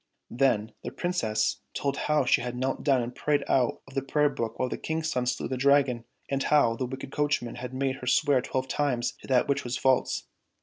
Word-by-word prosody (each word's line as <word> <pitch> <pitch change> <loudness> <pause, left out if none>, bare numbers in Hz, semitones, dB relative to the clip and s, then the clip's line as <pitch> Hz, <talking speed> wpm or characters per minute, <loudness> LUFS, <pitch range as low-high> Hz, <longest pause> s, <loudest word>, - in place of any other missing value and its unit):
Then 115 -4 +1
the - - -3
Princess 110 -12 0 0.2
told 140 -1 -1
how 150 -1 +1
she - - +3
had 125 0 -4
knelt 130 +2 -2
down 135 -4 +3
and 120 +1 -5
prayed 145 +1 0
out 125 -3 +1
of 135 - -14
the 135 - 0
prayer 150 +2 +2
book 115 -5 -4
while 130 - 0
the - - -3
King's 160 0 -2
son 125 -1 -1
slew 125 - -1
the 130 - -3
Dragon, 135 -3 +3 0.2
and 135 0 -1
how 135 -6 +3
the 125 +2 -3
wicked 135 +1 -7
coachman 145 -6 -1
had 125 0 -6
made 130 0 -1
her 125 - -8
swear 140 0 +3
twelve 130 +1 -2
times 130 -4 0
to - - -12
that 130 -2 +3
which 140 0 0
was 120 0 -2
false. 130 -1 +1
130 Hz, 220 wpm, -28 LUFS, 125-140 Hz, 0.2 s, she